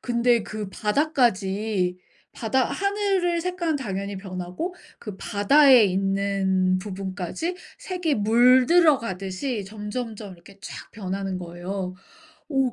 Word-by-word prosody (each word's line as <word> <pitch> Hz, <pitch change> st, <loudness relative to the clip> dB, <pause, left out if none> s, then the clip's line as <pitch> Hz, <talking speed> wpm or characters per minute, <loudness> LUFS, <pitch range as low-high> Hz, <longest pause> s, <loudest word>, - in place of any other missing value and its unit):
근데 235 Hz, -2 st, +2 dB
그 215 Hz, -2 st, -6 dB
바다까지 210 Hz, -, 0 dB, 0.4 s
바다 250 Hz, +3 st, 0 dB, 0.3 s
하늘의 360 Hz, -4 st, +1 dB
색깔은 345 Hz, -3 st, -1 dB
당연히 200 Hz, -5 st, -4 dB
변하고 185 Hz, -, -5 dB, 0.2 s
그 210 Hz, -4 st, -8 dB
바다에 250 Hz, +5 st, +5 dB
있는 190 Hz, -1 st, +1 dB
부분까지 195 Hz, -, -4 dB, 0.2 s
색이 360 Hz, -5 st, -1 dB
물들어 255 Hz, +8 st, +5 dB
가듯이 195 Hz, +2 st, -4 dB
점점점 210 Hz, 0 st, -6 dB
이렇게 175 Hz, +3 st, -17 dB
쫘악 -, -, -9 dB
변하는 195 Hz, -2 st, -4 dB
거예요. 180 Hz, +2 st, -5 dB, 0.6 s
어 270 Hz, -3 st, +1 dB
210 Hz, 255 characters per minute, -24 LUFS, 190-265 Hz, 0.6 s, 바다에